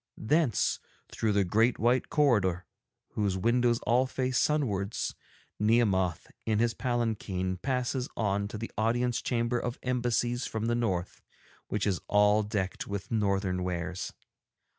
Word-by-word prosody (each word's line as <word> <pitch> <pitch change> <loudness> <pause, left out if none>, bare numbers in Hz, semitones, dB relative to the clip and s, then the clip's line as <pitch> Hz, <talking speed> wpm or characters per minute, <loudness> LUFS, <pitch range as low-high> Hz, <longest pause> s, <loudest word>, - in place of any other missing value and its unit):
Thence, 130 - +1 0.3
through 110 -2 0
the 100 0 +3
great 110 +6 +2
white 120 +3 +2
corridor 105 - +2 0.4
whose 100 -3 -1
windows 120 +3 +2
all 125 +3 +2
face 130 0 0
sunwards, 110 -9 0 0.5
Nehemoth, 100 -6 +2 0.2
in 110 -1 +1
his 115 +1 +2
palanquin, 110 -7 -1
passes 125 +3 -1
on 100 -2 0
to 110 - -6
the 115 +2 -6
Audience 120 +2 +1
Chamber 120 0 0
of 120 0 -3
Embassies 120 -1 0
from 110 0 -3
the 120 - +1
North, 95 -7 -1 0.5
which 105 - -1
is 95 -5 0
all 105 +1 +4
decked 100 -3 -3
with 100 -1 -5
Northern 100 -4 0
wares. 90 0 -3
110 Hz, 135 wpm, -29 LUFS, 100-120 Hz, 0.5 s, all